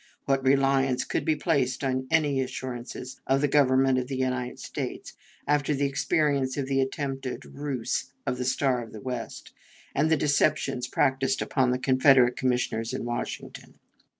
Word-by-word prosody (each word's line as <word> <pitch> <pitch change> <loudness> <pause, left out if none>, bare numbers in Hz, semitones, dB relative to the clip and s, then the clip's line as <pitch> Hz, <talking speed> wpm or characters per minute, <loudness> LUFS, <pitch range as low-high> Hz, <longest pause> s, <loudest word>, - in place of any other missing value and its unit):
What 135 -1 +1
reliance 135 -1 +3
could - - -2
be 160 -2 +2
placed 140 -5 0
in 130 -1 -1
any 145 -4 +2
assurances 125 0 -6
of 135 +1 +3
the 145 - +2
Government 135 -2 +3
of 125 - -4
the 135 -1 -4
United 130 -1 -2
States - - -6 0.3
after 145 0 +2
the 140 +1 0
experience 140 -1 +1
of 140 - -1
the 135 0 +1
attempted 135 -1 -3
ruse 135 -5 -3 0.2
of 125 - -2
the 125 - -2
Star 130 -1 +1
of 115 - -10
the 110 - -8
West 125 -1 -6 0.4
and 150 +3 +2
the 160 - +4
deceptions 140 -3 +1
practiced 135 +1 +1
upon 130 -3 +1
the 125 - +1
Confederate 130 -1 +4
Commissioners 125 -3 -1
in - - -4
Washington? 120 0 -5
135 Hz, 160 wpm, -27 LUFS, 125-140 Hz, 0.4 s, the